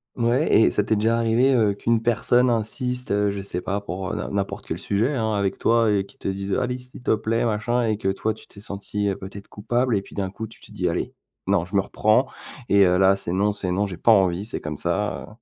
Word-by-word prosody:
Ouais 120 +6 +1
et 110 - +6
ça 105 - +1
t'es 110 - +1
déjà 110 +2 +2
arrivé, 115 +4 +3
heu, 105 -4 +3
qu'une 115 +3 +1
personne 120 +1 +3
insiste, 125 +3 -2
heu, 100 0 +2
je 100 - -4
sais 90 -2 -4
pas 100 +2 -2
pour, 95 -1 -5
heu, - - -2
n'im - - -4
n'importe 100 -1 -3
quel - - -3
sujet, 105 +7 0
hein, 110 -3 0
avec 100 -1 0
toi 115 -1 +3
et 100 -1 +1
qu'il - - -21
te - - -5
dise: 95 0 -2
«Allez, 125 0 0
s'il 125 0 -12
te - - +3
plaît, 110 +2 -1
machin» 120 +2 0
et 110 - 0
que 95 -2 -1
toi, 110 +3 -1
tu - - -14
t'es 100 - -15
sentie, 100 0 -4
heu, 95 - -1
peut-être 100 +1 -9
coupable 120 +2 0
et 95 - -3
puis - - -15
d'un 95 -2 -2
coup, 105 +4 -6
tu 110 - -14
te - - -15
dis: - - -2
«Allez, - - -2 0.3
non, 85 - +2
je 95 - -8
me 95 - +5
reprends 110 +7 +2 0.4
et 100 -1 +6
heu, 90 0 +3
là, 95 0 +5
c'est 90 -3 -4
non, 100 +2 +2
c'est 95 -3 -3
non, 100 +3 0
j'ai 90 - -7
pas 115 - +4
envie, 95 -2 +3
c'est 115 - -5
comme 75 -2 -5
ça!», 95 +5 -2
heu? - - -16
105 Hz, 260 wpm, -23 LUFS, 100-115 Hz, 0.4 s, et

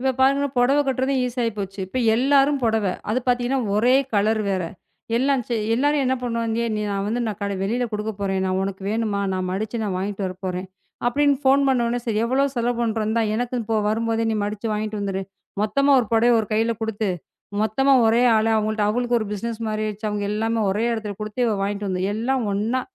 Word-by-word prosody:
இப்ப 265 +1 +1
பாருங்க, 275 +2 +4
புடவை 265 +4 +4
கட்டுகிறதும் 265 0 0
ஈஸி 250 0 -4
ஆகிப் 230 -2 -1
போச்சு. 195 0 -5
இப்போ 255 +7 -4 0.2
எல்லாரும் 275 +3 +3
புடவை. 220 -4 +1 0.2
அது 230 - +2
பார்த்தீங்கன்னா, 245 +1 +1 0.2
ஒரே 245 +4 +4 0.2
கலர் 215 +2 +2
வேற! 185 -2 0 0.5
எல்லாம் 270 +1 +2
செ 240 - -2 0.2
எல்லாரும் 290 +3 +2
என்ன 260 0 +2
பண்ணுவாங்க, 230 -1 -1
"நீ 210 - -2
நான் 200 0 -1
வந்து 230 +4 -1
நான் 210 -4 -4
கட 200 0 -2
வெளியில் 235 +5 -1
கொடுக்கப் 210 0 -3
போகிறேன் 195 -1 -1
நான், 185 0 0
உனக்கு 195 0 -4
வேண்டுமா? 215 -2 -1
நான் 185 -1 -2
மடிச்சு 215 +5 -3
நான் 200 -3 -2
வாங்கிட்டு 200 +2 -3
வரப் 185 +1 -6
போகிறேன்" 185 0 -3 0.4
அப்படின்னு 285 +3 +3
ஃபோன் 275 +1 +4
பண்ண 260 -2 +2
உடனே, 240 +1 0
"சரி 220 -2 0
எவ்வளவு 270 +3 +1
செலவு 240 0 0
பண்ணுகிறோம்? 220 -2 0
இந்தா 230 +1 +1
எனக்கும் 245 -1 -2
போ 225 - +2
வரும்போதே 225 +1 0
நீ 220 - 0
மடிச்சு 210 +2 -3
வாங்கிட்டு 215 0 -3
வந்துடு". 195 -1 -2 0.4
மொத்தமாக 275 +5 +3
ஒரு 235 - -3
புடவையை 235 +2 +4
ஒரு 215 - -4
கையில் 225 +1 +1
கொடுத்து, 220 -1 -1 0.5
மொத்தமாக 265 +4 +3
ஒரே 230 +2 +4
ஆள 220 - +2
அவர்களிடம், 215 -1 0
அவர்களுக்கு 240 +1 +1
ஒரு 215 - -3
பிசினஸ் 230 +2 -4
மாதிரி 215 0 -2
ஆகிவிட்டது. 215 +1 -4
அவர்கள் 205 -1 -2
எல்லாருமே 225 +1 0
ஒரே 210 +4 0
இடத்தில் 210 -3 -4
கொடுத்து 215 +3 -5
இவ 220 - +1
வாங்கிட்டு 205 0 -2
வந்து 185 -1 -1
எல்லாம் 245 +3 0
ஒண்ணா, 220 +6 0
225 Hz, 205 wpm, -23 LUFS, 205-245 Hz, 0.5 s, பாருங்க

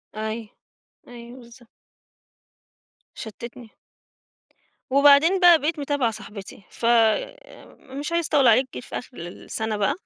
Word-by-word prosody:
أيوه، 220 0 -5 0.6
أيوه 240 +1 -12
بالضبط. 235 0 -17 1.5
شتتني. 235 +1 -10 1.2
وبعدين 285 +7 +5
بقى 350 -3 +7
بقيت 305 +1 -2
متابعة 280 -5 -1
صاحبتي، 205 -2 -11
ف 230 - -7
آآ 235 - 0 0.2
مش 295 +3 -5
عايزة 335 -2 0
أطوِّل 280 -4 +3
عليك 255 +4 +4
جيت - - -7
في - - -6
آخر 245 - -11
السنة 210 +5 -5
بقى 205 +7 +1
240 Hz, 120 wpm, -23 LUFS, 220-290 Hz, 1.5 s, بقى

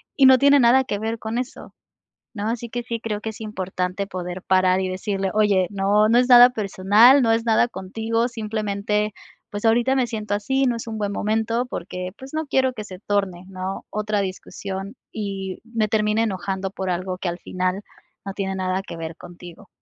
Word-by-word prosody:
y 270 - +6
no 260 0 +8
tiene 280 +2 +5
nada 255 +2 +5
que 205 -5 -3
ver 225 +2 -2
con 220 +2 -3
eso, 255 0 -7 0.6
¿no? 210 -1 -3
Así 235 0 -3
que 240 +1 -4
sí 235 -1 -4
creo 215 -2 -4
que 220 - -4
es 220 - -9
importante 190 -2 -3
poder 180 -1 -5
parar, 185 0 +3
y 185 - -1
decirle: 195 +1 -2
"Oye, 205 -4 +3
no, 205 +2 +3
no 235 - +4
es 250 - +2
nada 245 0 +10
personal, 215 +4 +5
no 230 -2 +3
es 225 +1 +1
nada 230 +1 +3
contigo, 225 +3 -2
simplemente, 210 -2 -2 0.4
pues, 205 0 -5
ahorita 240 +4 +3
me 255 -2 +1
siento 215 -3 -4
así, 265 +7 0
no 245 -2 +1
es 230 - -8
un 220 -1 -4
buen 205 -1 -1
momento, 225 +4 0
porque, 180 -4 -5
pues, 265 +2 -11
no 315 -1 -2
quiero 260 -1 +2
que 215 -3 -6
se 185 -3 -10
torne, 195 -3 -2
¿no? 190 0 -5
Otra 210 0 -1
discusión, 195 +2 -6 0.2
y 195 -3 -5
me 230 -2 -1
termine 215 +1 +1
enojando 190 -2 -2
por 190 -1 -4
algo 185 +1 -2
que 185 - -2
al 175 +1 -5
final 185 +2 -2 0.4
no 195 - -4
tiene 195 -1 -3
nada 185 0 -1
que 170 - -8
ver 165 0 -6
contigo". 175 -1 -12
210 Hz, 200 wpm, -23 LUFS, 190-230 Hz, 0.6 s, nada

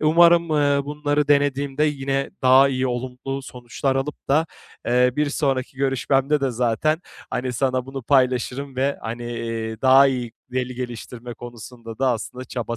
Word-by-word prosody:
Umarım, 170 +2 +5
eee, 145 -2 +2
bunları 145 0 -1
denediğimde 145 0 +2
yine 135 -2 -1
daha 130 +1 +6
iyi 130 -1 0
olumlu 130 +2 -4
sonuçlar 130 +2 -3
alıp 140 +2 -4
da, 155 +4 +3 0.4
eee, 125 +1 +3
bir 150 -1 +1
sonraki 135 -3 -1
görüşmemde 135 +2 +1
de 135 -1 0
zaten, 125 +7 0 0.3
hani, 125 0 -2
sana 130 +1 0
bunu 135 0 -6
paylaşırım 130 +1 +1
ve, 135 +2 0
hani, 120 +1 -5
iii, 115 -1 -4
daha 135 +1 +7
iyi 125 -4 -2 0.2
veli 125 0 -2
geliştirme 120 -1 -7
konusunda 120 -1 -10
da 130 -1 +2
aslında 125 +3 -6
çaba 115 -2 -4
130 Hz, 150 wpm, -22 LUFS, 125-140 Hz, 0.4 s, daha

